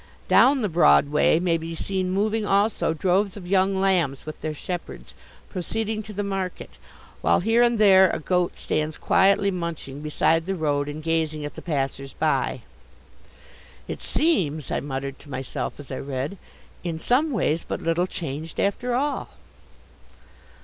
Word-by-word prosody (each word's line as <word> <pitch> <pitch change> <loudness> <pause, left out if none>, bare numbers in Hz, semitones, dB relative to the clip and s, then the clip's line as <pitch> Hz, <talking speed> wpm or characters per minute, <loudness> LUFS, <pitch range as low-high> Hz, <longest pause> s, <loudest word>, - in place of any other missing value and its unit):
Down 270 -2 +5
the - - +2
Broad 140 - +5
Way 150 +2 +3
may 170 -2 +1
be 165 +1 -6
seen 185 +2 -2
moving 210 +3 0
also 205 -2 +2
droves 190 +5 +1
of 190 - -9
young 190 0 +2
lambs 175 -8 +1
with 155 - -8
their 155 - -2
shepherds, 175 +3 -6 0.3
proceeding 215 +3 -3
to 215 0 -10
the 205 0 -3
market, 195 -2 -4 0.4
while - - +3
here 225 +5 +3
and 240 -1 +3
there 190 -3 +7
a - - -1
goat 180 +2 0
stands 155 0 -2
quietly 200 +1 +3
munching 170 -6 -5
beside 160 +2 +1
the 195 - -1
road 145 -3 0
and 155 +1 -7
gazing 160 -2 -1
at 145 - -6
the - - -9
passers 135 -3 -3
by." - - 0 1.3
"It - - -5
seems," 160 - 0
I - - 0
muttered 135 -1 -5
to 145 - -15
myself 130 +1 -4
as 145 - -10
I 130 - -4
read, 140 +7 -4 0.4
"in 165 -3 -3
some 265 - +2
ways 175 - 0
but - - -4
little 165 +2 0
changed 160 -2 -6
after 240 +5 0
all." 285 +3 -1
175 Hz, 160 wpm, -24 LUFS, 150-200 Hz, 1.3 s, there